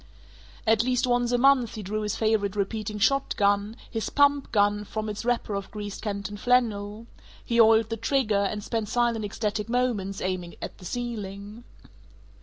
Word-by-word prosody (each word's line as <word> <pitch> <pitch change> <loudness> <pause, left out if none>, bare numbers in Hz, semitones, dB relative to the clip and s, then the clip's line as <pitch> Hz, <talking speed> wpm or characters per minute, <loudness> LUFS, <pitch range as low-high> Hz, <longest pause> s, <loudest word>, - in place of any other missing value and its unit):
At 220 -1 +4
least 250 +2 +1
once 245 -1 +1
a 245 - +3
month 255 -3 +4
he 215 - -6
drew 215 +3 -3
his 210 -1 -2
favorite 215 -3 +1
repeating 210 +1 -2
shotgun, 205 -3 +1 0.2
his 225 -1 -2
"pump 285 -1 +3
gun," 205 -1 +2
from 215 +1 -4
its 210 +1 -5
wrapper 240 -3 0
of 200 -1 -4
greased 205 -2 -6
canton 205 -1 -4
flannel; 220 -2 +1 0.4
he 235 0 +4
oiled 225 0 +5
the 225 - -1
trigger, 225 -3 +1
and 210 +1 -2
spent 220 -2 -2
silent 235 -2 +1
ecstatic 210 +1 -3
moments 230 -6 0
aiming 185 -2 -3
at - - -7
the 180 - -12
ceiling. 215 -1 -5
215 Hz, 165 wpm, -26 LUFS, 205-240 Hz, 0.4 s, oiled